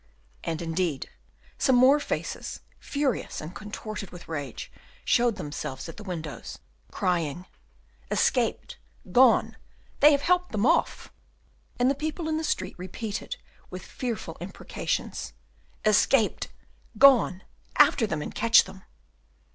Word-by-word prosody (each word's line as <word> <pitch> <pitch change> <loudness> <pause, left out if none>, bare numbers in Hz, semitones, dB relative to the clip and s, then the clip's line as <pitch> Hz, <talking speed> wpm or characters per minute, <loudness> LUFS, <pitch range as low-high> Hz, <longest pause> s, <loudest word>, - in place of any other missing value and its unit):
And 165 0 -3
indeed, 165 -3 -2 0.5
some 265 - +4
more 260 +4 +6
faces, - - -4 0.2
furious 280 -5 -2
and 155 +4 -7
contorted 210 +1 -7
with 175 -1 -12
rage, 145 -6 -5 0.3
showed 240 -2 +3
themselves 150 -6 -5
at 165 - -9
the 210 - -9
windows, 165 -7 -6 0.3
crying, 175 -1 -1 0.6
"Escaped, - - 0 0.3
gone, 255 +6 +5 0.4
they 295 +1 +8
have 285 -1 +2
helped 360 -2 +2
them 210 +1 +1
off!" - - +1 0.7
And 245 - +3
the 275 - +4
people 310 +3 -4
in 315 0 0
the 320 - -2
street - - -1
repeated, 200 +3 -5 0.3
with 185 0 -8
fearful 225 -10 -5
imprecations, 180 - -4 0.5
"Escaped! 215 +2 +3 0.5
gone! 240 -9 +6 0.3
After 225 - +5
them, 155 -7 -2
and - - -7
catch 230 +1 +6
them!" 190 - -12
210 Hz, 125 wpm, -27 LUFS, 170-260 Hz, 0.7 s, they